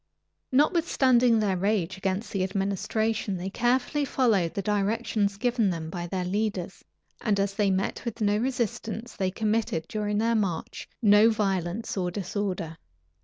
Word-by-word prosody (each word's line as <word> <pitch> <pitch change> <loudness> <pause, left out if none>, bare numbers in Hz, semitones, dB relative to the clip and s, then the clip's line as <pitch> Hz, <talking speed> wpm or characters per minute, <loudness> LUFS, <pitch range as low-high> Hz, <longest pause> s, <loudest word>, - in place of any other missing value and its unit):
Notwithstanding 260 -5 +4
their 205 -3 +1
rage 190 -1 0
against 195 +3 -2
the 195 -3 0
administration, 200 +2 -1
they 185 +2 -4
carefully 250 +6 +1
followed 225 -11 +1
the 200 - -2
directions 205 0 0
given 235 -2 +1
them 165 -2 -4
by 175 -1 -4
their 185 0 -2
leaders; 200 -1 -2 0.4
and 205 -3 +1
as 200 0 0
they 200 0 +1
met 190 0 -1
with 230 -1 -5
no 205 -1 +2
resistance, 230 -2 -3
they 190 -1 0
committed, 215 -4 -1
during 210 -1 -2
their 230 +2 +2
march, 195 -7 -2
no 210 +1 +7
violence 195 -1 -1
or 180 -2 0
disorder. 180 -3 -3
205 Hz, 145 wpm, -27 LUFS, 190-225 Hz, 0.4 s, no